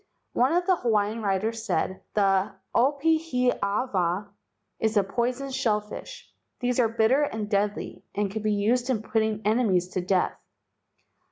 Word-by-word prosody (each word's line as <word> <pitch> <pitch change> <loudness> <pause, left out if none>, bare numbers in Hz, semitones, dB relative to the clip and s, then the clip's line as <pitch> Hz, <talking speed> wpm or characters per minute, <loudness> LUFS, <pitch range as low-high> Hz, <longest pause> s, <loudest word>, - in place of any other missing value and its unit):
One 255 +2 +3
of 350 +1 +2
the 370 -1 +3
Hawaiian 220 -2 0
writers 215 +3 -1
said: 185 -1 -1
"The 195 -1 +2 0.2
opihi 280 0 +2
awa 200 -2 0 0.5
is 220 -1 +1
a 200 - +5
poison 245 +7 -2
shell 220 -5 +1
fish. 350 - -10 0.3
These 250 0 0
are 230 -2 +4
bitter 230 +5 +3
and 220 -7 -2
deadly 205 0 -1
and 205 -1 0
can 220 +1 -4
be 215 0 +1
used 240 +5 +1
in 225 -5 0
putting 220 -1 0
enemies 210 -5 +2
to 185 - -2
death. 180 0 +1
220 Hz, 150 wpm, -26 LUFS, 200-250 Hz, 0.5 s, a